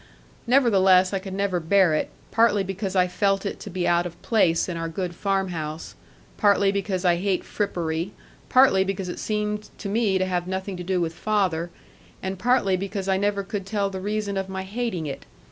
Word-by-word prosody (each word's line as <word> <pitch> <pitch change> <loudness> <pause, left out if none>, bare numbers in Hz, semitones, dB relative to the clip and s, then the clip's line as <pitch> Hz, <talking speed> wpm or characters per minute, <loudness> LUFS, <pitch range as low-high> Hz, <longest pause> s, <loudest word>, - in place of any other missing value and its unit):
Nevertheless 195 -7 +5
I 195 - +1
could 190 0 -7
never 195 -2 0
bear 175 0 +3
it, 155 - 0 0.2
partly 225 -3 +3
because 195 0 -4
I 180 -1 +4
felt 195 +2 0
it 200 - -3
to - - -8
be 180 -1 -2
out 175 0 +2
of 170 - -12
place 180 -7 +2
in 180 - -3
our 165 0 -3
good 175 +1 -3
farm 195 +1 0
house, 155 -2 -5 0.4
partly 200 -2 +4
because 195 -2 -2
I 175 -1 +4
hate 190 0 0
frippery, 170 -3 -2 0.4
partly 255 -7 +5
because 190 -1 -3
it - - -5
seemed 210 0 -2
to - - -6
me 210 -2 +2
to 185 - +1
have 180 -1 -2
nothing 190 +1 -3
to 180 - -5
do 185 0 0
with 165 -1 -1
father, 185 -5 0 0.5
and 190 0 -4
partly 240 -5 +3
because 195 +1 -4
I 190 -1 +2
never 200 0 0
could 195 0 -4
tell 200 -1 -1
the 190 -1 -5
reason 205 0 -2
of 195 0 -3
my 190 0 -4
hating 195 -4 -3
it. 140 - -6
190 Hz, 200 wpm, -24 LUFS, 180-200 Hz, 0.5 s, Nevertheless